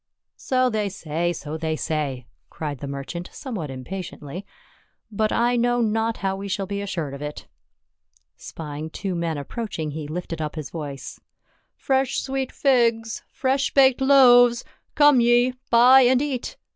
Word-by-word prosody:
"So 255 -1 +1
they 210 -2 -1
say, 170 -1 -2
so 155 -2 -6
they 160 0 -1
say," 145 -6 -3 0.2
cried 145 -4 -5
the 140 - -6
merchant, 140 +6 -6
somewhat 205 - -6
impatiently. 170 +5 -7 0.3
" - - -34 0.3
But 215 +1 0
I 240 +1 +2
know 245 0 +2
not 225 0 0
how 190 0 0
we 195 +1 -6
shall 195 0 -2
be 200 +1 -4
assured 170 -8 -4
of 140 - -8
it." 150 0 -6 0.9
Spying 155 0 -7
two 190 +3 -4
men 170 -2 -2
approaching 160 - -5
he 150 0 -6
lifted 165 0 -5
up 150 0 -4
his 155 -3 -6
voice 145 -5 -7 0.2
— - - -42
" - - -46
Fresh 265 -1 0
sweet 270 -1 -3
figs! 230 -5 +1
Fresh 270 -1 -1
baked 265 -1 +5
loaves! 245 -3 +6 0.3
Come 290 -4 +6
ye, 240 +1 +4 0.2
buy 250 +3 +7
and 250 0 +4
eat. 270 -3 -3
200 Hz, 160 wpm, -23 LUFS, 155-245 Hz, 0.9 s, buy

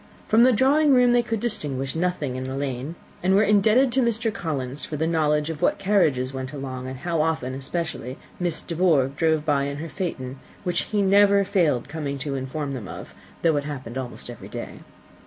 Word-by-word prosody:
From 220 +2 +5
the 255 +2 +7
drawing 275 +4 +4
room 250 -1 +5
they 240 0 +4
could 225 -2 -2
distinguish 140 - -2
nothing 165 -6 -1
in 130 0 -4
the 130 0 -4
lane, 135 +2 -3 0.3
and 190 +2 +3
were 205 - +5
indebted 215 +5 +4
to 260 +2 +2
Mr. 230 -2 +1
Collins 140 - -4
for 150 - -4
the 160 - 0
knowledge 155 -1 +1
of 155 - -8
what - - +2
carriages 155 -11 +2
went 130 +1 -5
along, 130 -2 -5
and 130 0 -6
how 170 -3 0
often 155 -5 -1
especially 135 -2 -4 0.2
Miss 175 -3 0
De 170 - -5
Bourgh 150 -6 +3
drove 160 -1 +1
by 140 -3 +2
in 140 0 -4
her 160 +2 -6
phaeton, 135 -9 -4 0.2
which 180 -2 0
he 210 -2 0
never 200 +1 +5
failed 160 -11 +1
coming 145 -2 -4
to 140 +1 -4
inform 135 +2 -3
them 120 -7 -6
of, - - -9 0.3
though 160 -3 +3
it 145 - -2
happened 130 -5 -6
almost 125 -2 -5
every 120 - -10
day. - - -7
155 Hz, 205 wpm, -24 LUFS, 135-195 Hz, 0.3 s, the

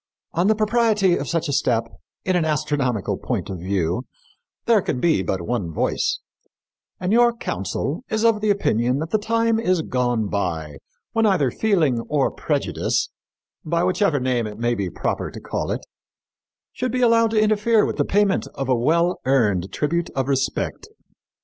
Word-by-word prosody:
On 175 +3 +2
the 220 - +4
propriety 215 -4 +2
of 140 - -3
such 165 -1 0
a 145 - -2
step, 120 -4 +2 0.4
in 185 - +1
an 175 - +2
astronomical 145 -8 -1
point 100 - -3
of 95 - -5
view, 90 +4 -1 0.6
there 225 -3 +4
can 125 - -2
be 160 - +2
but 95 -1 -2
one 100 -4 -2
voice; - - -1 0.8
and 185 +3 0
your 240 +1 +5
council 235 +1 -3
is 220 +1 0
of 225 -2 +3
the 215 - +1
opinion 125 - +1
that 160 +3 -4
the 215 - +2
time 230 +1 +1
is 185 -7 +1
gone 125 -5 0
by 80 -8 -3 0.3
when 225 -1 +2
either 155 -11 +2
feeling 165 - +1
or 145 -3 +1
prejudice, - - -1 0.5
by 170 +2 0
whichever 185 -4 +2
name 125 -3 0
it 105 -1 -8
may 120 +1 0
be 100 -5 -2
proper - - -2
to - - -9
call - - -4
it, - - -3 0.9
should 255 -1 -2
be 250 +1 -1
allowed 230 -1 +4
to 220 -1 +1
interfere 215 +1 +3
with - - -3
the - - +3
payment 205 -1 +1
of 135 - -3
a 130 - +3
well 170 +9 +2
earned 105 -9 +2
tribute 170 - -1
of 135 -1 0
respect. 135 -1 -1
155 Hz, 175 wpm, -22 LUFS, -, 0.9 s, your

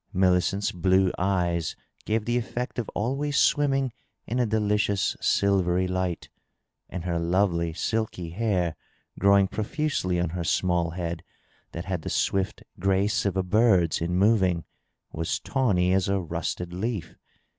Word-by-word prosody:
Mini 90 -2 +3
cent's 100 +3 -1
blue 95 +1 +2
eyes 90 -4 0 0.3
gave 110 0 0
the 120 - 0
effect 120 +1 -3
of 115 - -3
always 140 +6 -1
swimming 135 -3 +2 0.3
in 120 - -2
a 120 - +2
delicious 105 -2 +1
sil 100 -1 +3
very 90 +1 +1
light, 90 -2 -2 0.6
and 90 -2 -5
her 85 -1 -1
lovely, 85 -1 +1
silky 90 -2 -2
hair, 90 -5 0 0.4
growing 100 0 +5
profiisely 110 - -1
on 85 - 0
her 90 0 -3
small 85 0 +1
head 85 -1 -4 0.5
mat 85 - -6
had 90 -3 -2
the - - -5
swift 95 -1 -1 0.2
grace 95 +2 +1
of 95 -1 -1
a 95 - +2
bi^'s 95 -5 +3
in 85 +1 -1
moving, 95 -4 +3 0.5
was 80 0 -2
tawny 95 -9 +1
as 95 0 +1
a 100 0 +2
rusted 90 0 -4
leaf. 105 0 -3
95 Hz, 145 wpm, -26 LUFS, 90-105 Hz, 0.6 s, growing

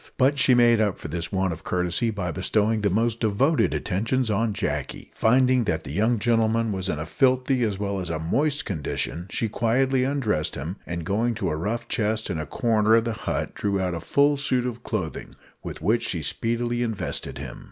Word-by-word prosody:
But 140 +2 +3
she 130 - +5
made 120 -2 +5
up 105 -3 +1
for - - -8
this 85 +2 -4
want 95 -2 0
of 80 - -10
courtesy 90 +5 0
by 95 -5 -3
bestowing 110 +6 +1
the 100 - +2
most 115 +4 0
devoted 125 +9 +2
attentions 115 +5 -1
on 110 +2 +1
Jacky. 75 -10 -4
Finding 125 +1 +3
that 80 -5 -1
that - - -7
young 110 +8 +2
gentleman 115 0 +1
was 95 -1 -3
in 75 - -1
a 75 - -4
filthy 130 - +2
as 105 -4 0
well 100 -1 -2
as 90 - -4
a 80 - -1
moist 145 - 0
condition, 85 +1 -3
she 115 - -1
quietly 125 +4 +1
undressed 130 - 0
him, 80 +8 -5
and 85 -1 -4
going 110 +5 0
to 85 - -2
a - - -1
rough 105 +9 -3
chest 110 -2 -1
in 85 - -2
a 75 - -4
corner 110 - +2
of 115 - +4
the 115 -1 -2
hut - - -3
drew 100 -1 -1
out 90 -1 -1
a 85 - -3
full 140 - +2
suit 130 -3 0
of 120 -1 -4
clothing, 90 - -4 0.3
with - - -8
which - - +2
she - - -2
speedily 120 +1 -1
invested 115 -4 -2
him. - - -7
110 Hz, 205 wpm, -25 LUFS, 90-120 Hz, 0.3 s, she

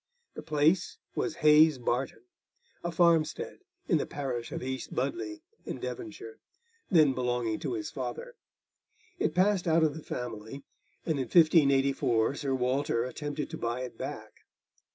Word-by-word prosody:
The - - -7
place 155 +4 +1 0.2
was 170 - -2
Hayes 150 -1 +7
Barton, 120 -1 -2 0.6
a 175 - -2
farmstead 165 -2 +2 0.3
in 165 -6 +3
the - - -2
parish 130 -5 -4
of - - -4
East 130 0 -5
Budleigh, 335 -2 -3 0.2
in - - -5
Devonshire, 395 +5 -7 0.5
then 155 -8 +5
belonging 120 -3 -1
to - - -3
his 330 -3 -4
father; - - -5 0.9
it - - 0
passed 185 0 +2
out 165 0 +4
of 155 -2 +2
the 160 - -7
family, 120 +2 -6 0.4
and 155 -4 0
in 130 - -1
1584 140 -6 +4
Sir 140 -2 -2
Walter 130 -1 0
attempted 145 +3 -4
to - - -6
buy 120 +2 -2
it 125 - -6
back. - - -6
145 Hz, 145 wpm, -29 LUFS, 125-170 Hz, 0.9 s, Hayes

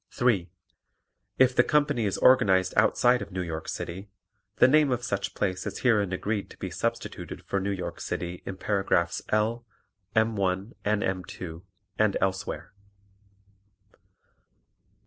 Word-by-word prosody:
(3) 115 -9 +1 0.9
If 130 -1 +4
the - - +7
company 145 -6 +2
is 100 - -1
organized 95 -7 +4
outside 120 +3 +4
of - - -7
New 90 0 -2
York 80 -2 -5
City, 95 +4 -5 0.5
the - - +6
name 150 +1 +4
of 120 -1 -1
such 100 -4 -2
place 95 -2 -1
is - - -5
herein 105 -6 +3
agreed 100 +2 -2
to - - -14
be - - -5
substituted - - -4
for 100 - -1
New 95 +1 -2
York 95 -3 -4
City 85 0 -4
in 95 - -6
paragraphs 95 -4 0
L, 110 +3 +1 0.5
M 110 0 +3
1 95 +2 -1
and 105 0 +1
M 95 -1 -1
2 85 -1 -8 0.4
and 110 -2 +3
elsewhere. 95 -1 -2
100 Hz, 145 wpm, -27 LUFS, 95-115 Hz, 0.9 s, the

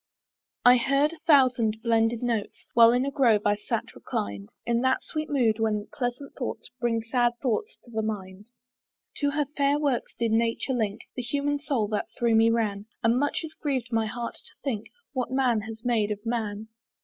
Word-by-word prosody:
I 250 +1 +9
heard 275 +5 +2
a 330 - -12
thousand 255 -7 +4
blended 230 0 +2
notes, 230 -4 -2
While 230 0 +8
in 250 +2 +2
a 280 - -2
grove 235 -7 +3
I 205 0 +4
sate 205 - -3
reclined, 100 0 -4 0.2
In 235 0 +1
that 260 0 +2
sweet 310 -1 -4
mood 235 -6 +2
when 215 -2 0
pleasant 250 +1 -3
thoughts 245 - -5
Bring 230 -2 +1
sad 240 +1 +1
thoughts 270 - -1
to 240 - -16
the 220 -1 -1
mind. 205 -2 -5 0.7
To 285 - +1
her 290 +1 0
fair 280 0 +3
works 285 -5 -1
did 230 -1 0
nature 230 +3 +1
link 215 -4 -1
The 250 - -2
human 285 +4 -1
soul 275 -7 0
that 210 -1 -1
through 235 -1 +2
me 225 +1 +5
ran; 215 -3 0 0.2
And 230 +2 +3
much 290 +3 0
it 320 - -6
griev'd 260 -5 -1
my 225 -1 +2
heart 235 +1 -5
to - - -13
think 225 -6 -2 0.3
What 255 -3 -1
man 255 -4 +2
has 225 +2 -9
made 225 -4 +2
of 210 +1 -4
man. 220 -2 -3
235 Hz, 190 wpm, -27 LUFS, 220-265 Hz, 0.7 s, I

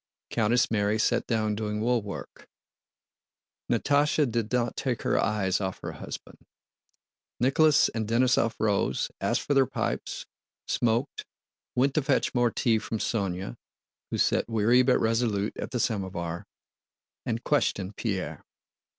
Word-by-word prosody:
Countess 115 +1 +2
Mary 105 -1 +1
sat 110 - +1
down 110 -2 +1
doing 105 0 -3
woolwork; 110 -3 -3 1.2
Natásha 145 +5 +3
did 115 -3 -2
not 120 -2 0
take 125 -5 -2
her - - +2
eyes 100 -3 0
off 95 -1 -3
her - - -4
husband. - - -9 1.0
Nicholas 145 +4 +4
and 110 -2 -3
Denísov 115 0 +2
rose, 105 -3 0
asked - - +1
for 145 - 0
their 135 -2 +4
pipes, - - -3 0.4
smoked, 120 +4 0 0.5
went 135 +2 +2
to 155 - +2
fetch 135 0 +1
more 120 -1 +3
tea 115 0 +1
from 110 - -4
Sónya—who 95 - -5
sat - - +2
weary 115 +3 +4
but 125 0 +4
resolute 110 -2 0
at - - -4
the 125 - -2
samovar—and 95 +3 -5
questioned 100 -9 0
Pierre. 100 -5 -3
115 Hz, 125 wpm, -27 LUFS, 105-125 Hz, 1.2 s, Nicholas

